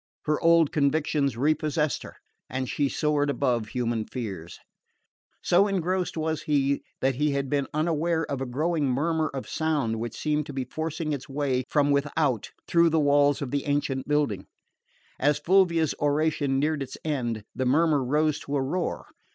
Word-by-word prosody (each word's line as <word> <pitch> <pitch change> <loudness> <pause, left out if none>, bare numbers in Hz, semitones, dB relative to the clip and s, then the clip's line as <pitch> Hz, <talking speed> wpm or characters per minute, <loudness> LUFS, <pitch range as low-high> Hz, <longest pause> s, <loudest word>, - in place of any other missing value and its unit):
Her 150 0 0
old 165 -2 +5
convictions 145 -2 +1
repossessed 155 +1 0
her - - -10 0.3
and 130 +1 -3
she 140 +3 0
soared 145 -1 +1
above 125 -6 0
human 115 -2 -2
fears. 95 -9 -6 0.9
So 190 +4 +4
engrossed 185 -2 -1
was 160 0 -1
he 140 -2 +1 0.2
that 135 -1 +1
he 150 0 +1
had 140 -1 -2
been 140 -2 +1
unaware 160 +1 0
of 140 -2 -4
a 135 - -2
growing 150 +3 0
murmur 155 +4 0
of 135 -1 -6
sound 145 -8 -1
which 115 +1 -5
seemed 150 -1 -1
to 145 - -7
be 135 -1 -2
forcing 160 +2 -3
its 140 0 -6
way 135 -2 -1
from 145 -1 +2
without 140 -3 0 0.2
through 170 0 +4
the 160 0 +2
walls 145 -1 +3
of 130 - -5
the 140 -1 -1
ancient 145 -2 -1
building. 145 -10 0 0.7
As 145 +1 +3
Fulvia's 170 -1 +3
oration 145 -2 +1
neared 150 +1 0
its 135 - -6
end 120 -8 -2
the 130 - -1
murmur 150 +1 +3
rose 150 +4 +1
to 145 - -4
a 140 - +1
roar. 175 +6 -2
145 Hz, 170 wpm, -26 LUFS, 135-155 Hz, 0.9 s, old